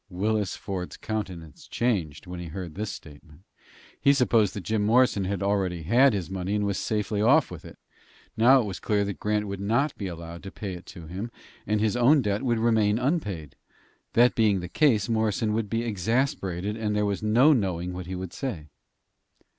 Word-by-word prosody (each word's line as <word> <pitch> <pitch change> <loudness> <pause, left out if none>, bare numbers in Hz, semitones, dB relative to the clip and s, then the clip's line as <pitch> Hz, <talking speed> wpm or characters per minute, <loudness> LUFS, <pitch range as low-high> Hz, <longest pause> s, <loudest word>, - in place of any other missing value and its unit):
Willis 105 +1 -1
Ford's 95 -3 -5
countenance 90 -8 -6
changed 95 -11 -1
when 90 -1 -7
he 85 - -6
heard 85 0 -6
this 105 +4 -4
statement. 75 0 -12 0.6
He 140 - +5
supposed 115 -6 +2
that 100 - -5
Jim 110 +1 0
Morrison 110 -3 +3 0.2
already 95 -4 0
had 120 - +4
his 95 -4 -2
money 95 +1 -3
and 105 -1 0
was 100 -2 -1
safely 105 -1 -1
off 135 +5 +4
with 90 - -9
it. - - -12 0.6
Now 125 +4 +6
it - - -3
was 95 -3 -5
clear 105 -1 0
that 100 -1 -5
Grant 105 0 0
would 100 -1 -5
not 120 +9 0
be 100 - -3
allowed 85 -1 -8
to 95 - -8
pay 100 -3 -6
it 90 0 -10
to 85 -4 -10
him, 95 +8 -5 0.4
and 105 +1 +1
his 110 +1 +1
own 130 +4 +4
debt 105 +1 0
would 120 -3 +1
remain 110 -2 +2
unpaid. 110 - -2 0.6
That 120 +1 +5
being 105 -4 +2
the 90 - -5
case, 110 - +2
Morrison 110 -1 0
would 110 -1 -1
be 115 +2 -1
exasperated, 105 -3 -1
and 105 -2 -2
there 105 0 +1
was 100 -1 -2
no 120 +8 +5
knowing 90 -7 -1
what 90 -1 -6
he 95 - -4
would 90 -1 -6
say. 90 - -5
105 Hz, 195 wpm, -26 LUFS, 90-115 Hz, 0.6 s, Now